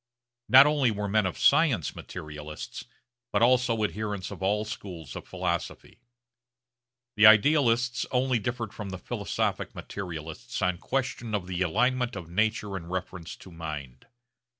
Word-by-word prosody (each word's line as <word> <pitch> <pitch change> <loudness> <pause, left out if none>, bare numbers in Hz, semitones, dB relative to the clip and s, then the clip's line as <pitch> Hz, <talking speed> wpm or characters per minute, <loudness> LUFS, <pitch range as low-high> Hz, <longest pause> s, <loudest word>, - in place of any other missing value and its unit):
Not 130 +2 +10
only 145 -4 +3
were 105 -1 -2
men 105 -1 +2
of 95 - -5
science 140 - +3
materialists, 75 0 -8 0.5
but 105 +2 +2
also 125 -2 +3
adherents 105 -2 -3
of - - -8
all 105 +3 +1
schools 90 - -7
of - - -8
philosophy. - - -4 1.2
The 105 +1 +8
idealists 120 +1 +4
only 125 -1 +1
differed 115 0 -4
from 105 -2 -6
the 95 - -5
philosophic - - -2
materialists 80 -5 -6
on 90 -1 0
question 120 -4 -2
of 100 -3 -2
the 90 0 -4
alignment 125 +7 +1
of 85 -4 -8
nature 105 +1 0
in 85 -3 -6
reference 90 -1 -5
to 95 - -14
mind. 75 -6 -7
105 Hz, 140 wpm, -28 LUFS, 90-120 Hz, 1.2 s, Not